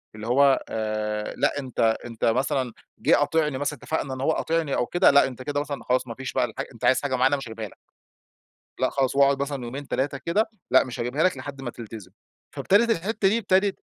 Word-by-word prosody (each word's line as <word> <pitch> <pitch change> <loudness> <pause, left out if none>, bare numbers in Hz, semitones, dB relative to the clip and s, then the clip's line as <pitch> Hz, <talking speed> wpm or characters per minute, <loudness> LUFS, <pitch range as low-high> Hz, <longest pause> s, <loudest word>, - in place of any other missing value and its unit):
اللي 110 +1 -7
هو، 135 +2 +4
آآ 110 -1 -2
لأ 145 - +1
أنت 130 -3 -8 0.3
أنت 115 -2 -3
مثلًا 130 0 +1 0.3
جه - - +4
قاطعني 150 -1 +1
مثلًا 145 +1 -2
اتفقنا 150 -4 -2
إن 130 - -6
هو 150 +4 +2
قاطعني 160 -3 0
أو - - +1
كده، 175 +7 +4
لأ 140 0 +5
أنت 130 -1 -9
كده 145 +2 -2
مثلًا 145 -1 -5
خلاص، 125 0 0
مافيش 125 +3 -6
بقى - - +2
الحا - - -5
أنت - - -6
عايز 130 - +4
حاجة 135 -3 -1
معينة 130 +3 +3
مش 135 - -7
هجيبها 110 -1 -6
لك. - - -18 1.0
لأ، - - +2
خلاص. 135 -1 0
وأقعُد 140 0 +4
مثلًا 140 -3 -4
يومين، 135 +3 -7
3 140 +1 -1
كده 210 +9 0 0.2
لأ، 130 - +6
مش 125 - -7
هجبيها 125 +6 -1
لك 185 - +3
لحد 135 +1 -8
ما 120 - -4
تلتزم. 110 -5 -10 0.4
فابتدت 230 +4 +3
الحتة 200 +2 +1
دي 220 +4 +2
ابتدت 195 -2 +1
135 Hz, 210 wpm, -25 LUFS, 125-150 Hz, 1.0 s, لأ